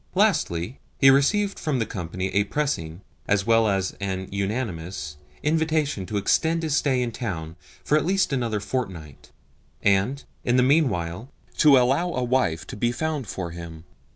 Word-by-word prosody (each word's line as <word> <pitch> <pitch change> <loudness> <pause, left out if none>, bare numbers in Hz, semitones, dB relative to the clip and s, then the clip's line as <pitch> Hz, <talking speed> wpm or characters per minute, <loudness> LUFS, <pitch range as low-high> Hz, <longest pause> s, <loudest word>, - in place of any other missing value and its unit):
Lastly, 135 - +1 0.2
he 135 - +7
received 200 +10 +2
from 150 -4 -1
the 115 - 0
company 95 0 -4
a 100 +2 +3
pressing, 100 - -2 0.3
as 100 -1 +2
well 115 -1 +4
as 95 -2 0
an 95 -1 -3
unanimous, 95 -7 -3 0.3
invitation 155 - 0
to 105 - -2
extend 165 +11 +1
his 155 -3 0
stay 130 -5 +2
in 120 - -3
town 85 -10 -5 0.3
for 150 - +3
at - - -2
least 190 -4 +1
another 115 -5 0
fortnight, 95 - -5 0.5
and, 100 +8 +2 0.2
in 120 +1 +2
the 125 - +5
meanwhile, 115 - +1 0.3
to 145 -3 +7
allow 135 +8 +2
a 125 - -1
wife 120 -10 0
to - - -8
be 120 +3 0
found 150 -1 -2
for 90 -3 -5
him. 85 -1 -9
115 Hz, 160 wpm, -24 LUFS, 95-145 Hz, 0.5 s, he